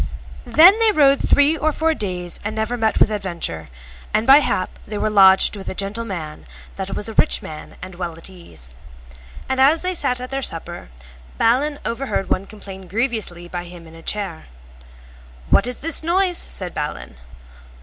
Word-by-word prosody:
Then 370 +7 +7
they 450 -1 +4
rode 280 -6 +4
three 290 +2 +3
or 310 0 0
four 320 +2 +1
days 180 - -4
and 210 +1 -4
never 220 +2 -1
met 220 -2 0
with 220 - +4
adventure, 170 - -4 0.5
and 215 +1 +1
by 270 +3 +8
hap 185 -10 -1
they 210 - -5
were 215 - -1
lodged 195 -1 +5
with 195 -2 -7
a - - -5
gentle 200 +4 -4
man 160 -7 -7 0.3
that 195 0 -5
was 210 - -2
a 225 - -5
rich - - +2
man 155 -1 -9
and 185 0 -8
well 175 -1 -5
at 165 - -9
ease. 80 - -12 0.8
And 265 0 0
as 305 +5 +4
they 370 0 -1
sat 265 -7 -1
at 250 +1 -7
their 270 0 -2
supper 165 - -4 0.5
Balin 280 +6 +2
overheard 235 -5 -3
one 195 +1 0
complain 195 -3 -11
grievously 210 -5 -2
by 175 0 -6
him 175 -1 -12
in 160 - -14
a 165 - -13
chair. 190 -3 -4 1.0
What - - +4
is 250 - -5
this 330 -2 0
noise? 355 +2 +2
said 180 -2 -2
Balin. 150 - -5
210 Hz, 180 wpm, -20 LUFS, 180-270 Hz, 1.0 s, by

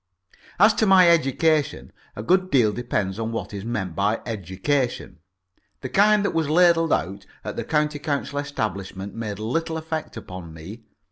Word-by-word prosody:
As 215 +4 +6
to 220 - +1
my 190 -2 +7
education, 155 -1 +1 0.2
a 105 - -6
good 185 +8 +2
deal 120 - +3
depends 105 -4 -2
on 115 0 -2
what 115 -2 -5
is 100 -1 -5
meant 105 -7 -3
by 105 +3 +1
education. 105 - -2 0.6
The 130 - -5
kind 205 +6 +4
that - - 0
was 160 -3 0
ladled 165 0 +4
out 95 +4 -1 0.2
at - - -5
the - - -3
County 150 -1 0
Council 145 -1 -2
establishment 100 -8 -4
made 110 -3 -5
little 160 +10 -2
effect 160 0 -5
upon 90 -3 -9
me. 100 +9 -10
125 Hz, 160 wpm, -23 LUFS, 100-160 Hz, 0.6 s, my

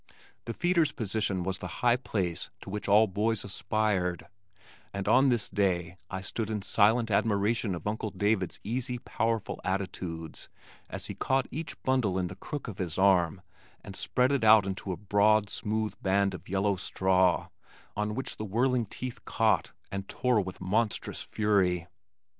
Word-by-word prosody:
The 115 - -4
feeder's 175 -3 +2
position 105 -5 -1
was 95 +1 -2
the 90 - -5 0.2
high 120 -1 +5
place 95 -9 -2
to - - -8
which 105 +1 -4
all 105 +2 +6
boys 105 +2 0
aspired, 95 -3 -1 0.7
and 100 -1 -4
on 135 +1 +5
this 120 -4 +1
day 90 -3 0
I 95 0 -4
stood 110 +3 -3
in 105 -3 -2
silent 110 +3 +3
admiration 105 0 +1
of 85 - -8
Uncle 110 +1 -2
David's 100 -1 0
easy 125 +3 -2
powerful 115 -2 -2
attitudes 90 -4 -4 0.4
as - - -6
he - - -5
caught 135 -1 +1
each 160 +3 -5
bundle 125 -8 +1
in 90 -1 -1
the 90 - -8
crook 145 +8 -6
of 105 -6 -7
his 90 -4 -3
arm 95 -2 +3 0.4
and 95 - -9
spread 125 +6 +1
it 140 -4 +1
out 110 -2 +7
into 95 0 -4
a 90 - -3
broad, 105 0 +3
smooth 110 0 -2
band 100 0 +2
of 90 - -9
yellow 100 +1 +1
straw 95 -1 +2 0.5
on 105 +1 -1
which 130 - -4
the - - -4
whirling 120 +3 +1
teeth 125 +4 -7
caught 110 -2 +2 0.2
and 100 0 -5
tore 125 -4 +2
with 95 -1 -7
monstrous 105 +4 -1
fury. 95 -5 +1
105 Hz, 165 wpm, -29 LUFS, 95-115 Hz, 0.7 s, out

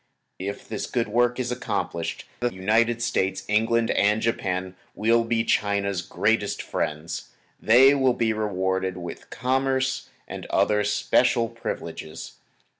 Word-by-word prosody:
If 100 +2 -5
this - - -4
good 115 -3 -1
work 120 +3 +2
is 125 -1 -1
accomplished, 105 -9 -3
the 120 0 0
United 115 +5 +1
States, 95 -5 0
England 115 +2 +2
and 105 +2 +3
Japan 95 -5 -2 0.2
will 115 +2 +3
be 115 0 0
China's 100 -4 0
greatest 105 +3 0
friends. 80 +2 -3 0.3
They 130 +5 +7
will 130 -3 +2
be 110 -1 +1
rewarded 95 -3 -1
with 85 -1 -8
commerce 130 +1 0 0.2
and - - -7
other 105 0 +2
special 115 +3 +2
privileges. 85 -8 -6
110 Hz, 125 wpm, -25 LUFS, 95-120 Hz, 0.3 s, They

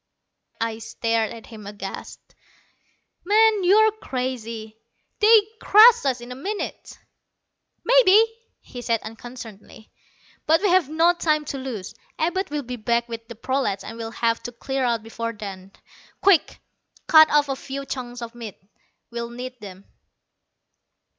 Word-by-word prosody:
I 225 -1 -2
stared 225 0 -1
at 230 -1 -10
him 215 -3 -11
aghast. 200 -2 -8 1.0
"Man, 430 +1 +4
you're 430 +4 +5
crazy. 240 - -5 0.4
They'd 430 -1 +6
crush 445 -1 +7
us 260 -3 0
in 240 +1 -10
a - - -6
minute!" 400 +11 -6 0.9
"Maybe," 455 -3 +6 0.4
he 245 - -10
said 230 -2 -1
unconcernedly. 225 -1 -11 0.6
"But 320 +5 +3
we 405 - +3
have 355 -5 +3
no 330 +3 +3
time 310 -3 0
to 275 -1 -5
lose. 235 -8 -6 0.2
Abud 360 +3 -1
will 295 0 -3
be 250 0 -6
back 235 +1 0
with 230 -1 -8
the 235 - -9
prolats, 255 -4 -2
and 225 - -8
we'll 225 -1 -6
have 230 0 -1
to 245 - -7
clear 265 +3 -3
out 235 -3 0
before 230 +1 -5
then. 195 -3 -9 0.5
Quick 380 -6 +3 0.5
cut 315 -2 +7
off 295 -1 +3
a 270 - -2
few 275 +1 -7
chunks 245 -2 -6
of 230 0 -8
meat. 230 -4 -9 0.5
We'll 235 0 -5
need 250 +1 -8
them." 195 -1 -11
245 Hz, 145 wpm, -23 LUFS, 230-315 Hz, 1.0 s, crush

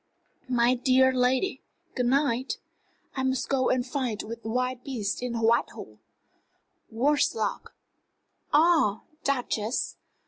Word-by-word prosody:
"My 245 0 +3
dear 260 +1 +3
lady, 255 +8 +1 0.3
good 250 -1 0
night. 260 -1 +1 0.6
I 265 - -1
must 260 0 -1
go 260 -2 +2
and 255 -1 +1
fight 250 -5 -2
with 230 +1 -8
wild 250 +2 -2
beasts 215 -7 -3
in 245 -1 -3
Whitehall 230 +1 0 0.9
worse 285 +6 +1
luck! 220 - -3 0.8
Ah, 300 - +3 0.2
Duchess! 245 -4 -1
250 Hz, 110 wpm, -27 LUFS, 235-265 Hz, 0.9 s, My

